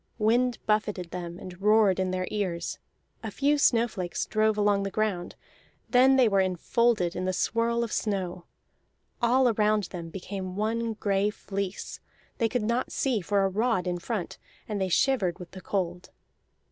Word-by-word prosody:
Wind 235 +2 +2
buffeted 210 -5 0
them 175 -1 -6
and 180 0 -10
roared 210 -2 +4
in 185 0 0
their 185 0 -2
ears; 180 -5 -2 0.4
a - - -4
few 290 +1 +1
snowflakes 230 -9 +1
drove 215 0 +1
along 205 -1 +3
the 195 - -2
ground; 195 -4 -2 0.6
then 260 +2 +6
they 255 -3 +5
were 200 -2 +2
enfolded 185 +1 +1
in 180 - -2
the 185 - +1
swirl 235 +4 +1
of 230 - -4
snow. 185 -4 -2 0.8
All 250 +2 +4
around 215 -1 +2
them 170 -3 -6
became 185 +1 -6
one 225 +2 -1
gray 205 -1 +1
fleece, 200 -2 -5 0.4
they 230 -2 +2
could 245 -2 -1
not 235 +4 -1
see 250 -6 0
for 200 +2 +1
a - - +1
rod 215 -1 0
in 175 -1 -2
front, 205 -1 -4 0.3
and 210 -2 -3
they 190 - 0
shivered 190 -4 +2
with 180 -1 -10
the 190 - -10
cold. 180 -2 -3
205 Hz, 165 wpm, -27 LUFS, 185-230 Hz, 0.8 s, then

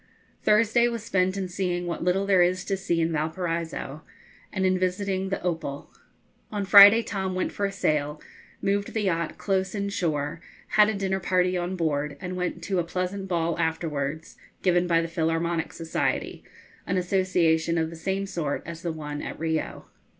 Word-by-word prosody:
Thursday 230 +2 +4
was 235 -2 -3
spent 185 -2 +1
in 190 -1 -2
seeing 180 -1 -2
what 170 -1 -3
little 185 +3 +1
there 195 -2 +4
is 180 +1 +2
to 195 - 0
see 185 -3 -1
in 165 +1 +1
Valparaiso, 160 -1 -3 0.5
and 190 -1 -1
in 185 0 +2
visiting 190 +1 -1
the 195 - -1
'Opal.' 165 -5 -3 0.6
On 205 -2 -2
Friday 205 +3 +9
Tom 190 -3 -3
went 185 - -1
for 200 - -1
a - - -5
sail, 150 -4 0 0.4
moved 200 +2 0
the 220 - 0
yacht 170 -4 -1
close 190 0 -1
inshore, 170 -7 -2 0.3
had 210 0 +5
a 220 - -1
dinner 195 -1 -1
party 185 0 +1
on 180 +1 -2
board, 150 -4 -1
and 180 0 -5
went 180 -1 -3
to 190 +1 0
a - - +1
pleasant 185 +3 -3
ball 170 -2 0
afterwards, 160 -2 -2 0.3
given 180 -1 +3
by 165 -1 +3
the 165 - -2
Philharmonic 165 0 -1
Society, 165 -1 -2 0.4
an 185 - 0
association 175 -3 +2
of 160 0 0
the - - -8
same 190 +4 -2
sort 165 -7 -3
as 170 0 -7
the 170 - -2
one 150 -2 -5
at - - -6
Rio. 160 -1 -2
180 Hz, 175 wpm, -26 LUFS, 165-195 Hz, 0.6 s, Friday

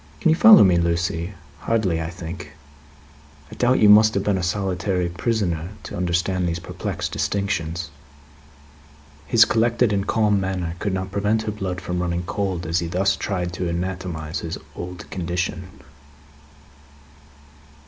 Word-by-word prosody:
Can - - +2
you 160 - +5
follow 215 +3 +9
me, 90 -3 +4
Lucie? 85 +2 -1 0.2
Hardly, 95 -7 0
I 80 - -3
think? 85 -1 -8 1.0
I - - -9
doubt 125 +1 +2
you 105 - +5
must 110 +1 +7
have 100 - 0
been 100 -2 +1
a - - -2
solitary 90 0 -1
prisoner 90 -3 -2
to - - -7
understand 90 +1 0
these 85 - -2
perplexed 85 - -5
distinctions." 90 -5 -2 1.4
His 110 +10 +6
collected 115 0 +2
and 100 0 -1
calm 105 -2 +2
manner 95 -3 -2
could 100 - -1
not 95 0 -4
prevent 105 +3 0
her 110 - -2
blood 95 -3 -4
from 90 0 -3
running 85 0 -2
cold, 95 -2 -3
as 80 +2 0
he 85 - -3
thus 95 +4 +1
tried 90 -4 -3
to 90 -1 -2
anatomise 85 -3 -4
his 80 0 -5 0.2
old 90 0 -7
condition. 90 0 -3
90 Hz, 150 wpm, -22 LUFS, 85-100 Hz, 1.4 s, follow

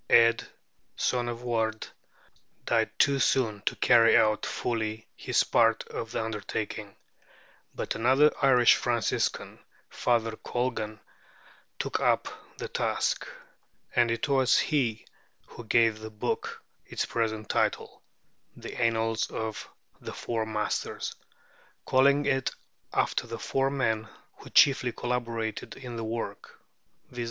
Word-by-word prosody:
Ædh 115 0 +5 0.5
son 120 -1 0
of 120 0 -6
Ward 110 -2 -1 0.8
died - - +2
too 140 -1 +3
soon 110 -4 +1
to - - +1
carry 115 -2 +5
out 110 -1 +2
fully 110 -2 -3
his - - +1
part 115 -1 +3
of 115 - -5
the 115 - -2
undertaking: 105 -1 -5 0.8
but - - -2
another 130 +6 +4
Irish 125 -3 +6
Franciscan, 120 -4 -1 0.3
Father 115 -2 0
Colgan, 115 -4 -3 0.8
took - - -2
up - - +2 0.3
the - - -5
task; - - -1 0.7
and 120 -1 +4
it 115 +4 -1
was 135 -3 +4
he 120 -8 0 0.4
who 120 - -11
gave 115 -1 +3
the 110 0 -7
book 105 -1 -4 0.2
its - - -3
present 110 -2 -2
title, - - -1 0.5
'The - - -8
Annals 115 -1 +1
of 110 -1 -5 0.3
the - - -7
Four 115 -2 -3
Masters,' 105 -1 -2 0.7
calling 140 +2 +4
it 135 -1 +1 0.4
after - - 0
the 115 0 -5
four 135 +3 0
men 115 -5 -1 0.3
who - - -13
chiefly 135 -3 +5
collaborated 115 -3 -3
in 125 -3 -8
the 115 - -4
work, 115 +1 -5 0.5
viz. 125 - -8
115 Hz, 125 wpm, -28 LUFS, 110-125 Hz, 0.8 s, Irish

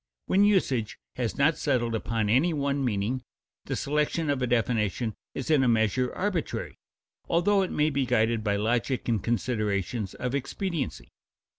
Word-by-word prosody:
When 195 +2 +3
usage 140 - +2 0.2
has 120 -3 -2
not 150 +3 +3
settled 120 -5 +1
upon 110 -1 -1
any 135 +11 +3
one 140 -1 0
meaning, 120 +2 -1 0.4
the - - -2
selection 150 +2 0
of 135 -2 -1
a 125 - +1
definition 115 -2 0 0.2
is 135 - -3
in 150 -3 +5
a - - +3
measure 115 +2 +2
arbitrary, 185 -5 -2 0.5
though 195 +4 +3
it 185 - -1
may 150 +1 +1
be 135 -2 0
guided 115 -2 +2
by 100 -1 +1
logic 120 +5 0
and 115 -5 0
considerations 110 -3 -1
of 125 0 -3
expediency. 140 - -3
125 Hz, 155 wpm, -27 LUFS, 110-150 Hz, 0.5 s, in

